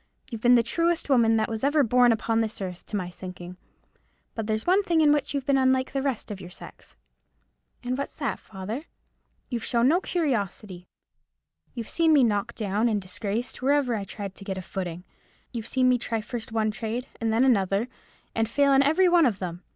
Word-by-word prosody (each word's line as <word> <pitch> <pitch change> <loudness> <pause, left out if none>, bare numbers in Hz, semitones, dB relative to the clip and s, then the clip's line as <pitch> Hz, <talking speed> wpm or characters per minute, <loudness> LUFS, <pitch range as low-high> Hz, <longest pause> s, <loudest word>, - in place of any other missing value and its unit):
You've 230 -2 -6
been 245 +1 +6
the 235 - +4
truest 335 +6 0
woman 230 -3 +4
that 220 - +1
was 225 +1 -5
ever 290 +1 +3
born 245 0 +4
upon 225 0 0
this 220 -1 -2
earth, 185 -2 -6
to - - -5
my 180 -3 -3
thinking; 180 -1 -9 0.8
but 225 -2 -4
there's 215 0 -1
one 375 +3 +4
thing 345 -5 +1
in 300 -2 +5
which 295 - -1
you've 275 -2 -2
been 275 -1 +3
unlike 260 0 +2
the 275 - 0
rest 265 -5 -3
of 195 -2 -6
your 180 - -9
sex." 180 - -14 0.9
"And 250 +1 -1
what's 280 +1 -5
that, 275 -9 -2
father?" 215 - -7 0.6
"You've 235 -3 -3
shown 240 0 +2
no 345 +5 +3
curiosity. 210 - -2 0.9
You've 230 -3 -5
seen 325 -2 +3
me 285 -3 +6
knocked 205 -4 0
down 215 +2 0
and 210 -2 +1
disgraced 200 +6 -4
wherever 275 -2 +2
I 210 -3 -2
tried 195 0 -7
to 195 - -12
get 195 -1 -4
a 185 - -5
footing; 180 -2 -5 0.5
you've 230 -2 -5
seen 255 0 +2
me 250 -1 +3
try 230 -1 -2
first 225 +1 -6
one 220 -1 +1
trade 225 +3 -4
and 225 -1 0
then 225 +3 +3
another, 200 -2 +2 0.5
and 225 -1 0
fail 280 +3 +3
in 270 - +6
every 320 +7 +4
one 345 -4 +5
of 215 -6 -1
them. 175 -2 -5
230 Hz, 205 wpm, -26 LUFS, 205-270 Hz, 0.9 s, been